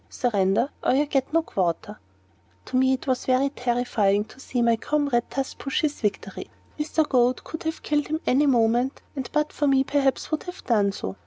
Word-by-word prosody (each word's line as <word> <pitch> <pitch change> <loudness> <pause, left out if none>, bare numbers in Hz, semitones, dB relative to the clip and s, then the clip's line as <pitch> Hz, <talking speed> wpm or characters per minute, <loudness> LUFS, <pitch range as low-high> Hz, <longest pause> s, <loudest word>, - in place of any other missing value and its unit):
Surrender, 210 +1 +1
or - - +2
you 285 +3 +3
get 275 -2 -1
no 330 +1 +2
quarter." 195 - -2 0.7
To - - -6
me 260 +1 +4
it 260 - -3
was 260 -2 -1
quite 270 +2 +1
terrifying 235 -5 +1
to 220 - -17
see 250 -2 -1
my 235 -1 +4
comrade 280 0 0
thus 270 -1 -3
push 275 - -2
his 300 -2 -1
victory. 210 -3 -3 0.3
Mr. 310 0 +1
Goad 250 -1 +2
could 320 - -7
have 320 0 -3
killed 295 -1 0
him 310 - -1
at 315 - -4
any 285 +3 +3
moment, 240 +1 +2
and 265 -3 -4
but 300 0 0
for 290 - 0
me 270 -1 +4
perhaps 275 -1 0
would 310 - 0
have 360 0 -9
done 205 -4 +2
so. 95 - -6
260 Hz, 200 wpm, -25 LUFS, 235-290 Hz, 0.7 s, me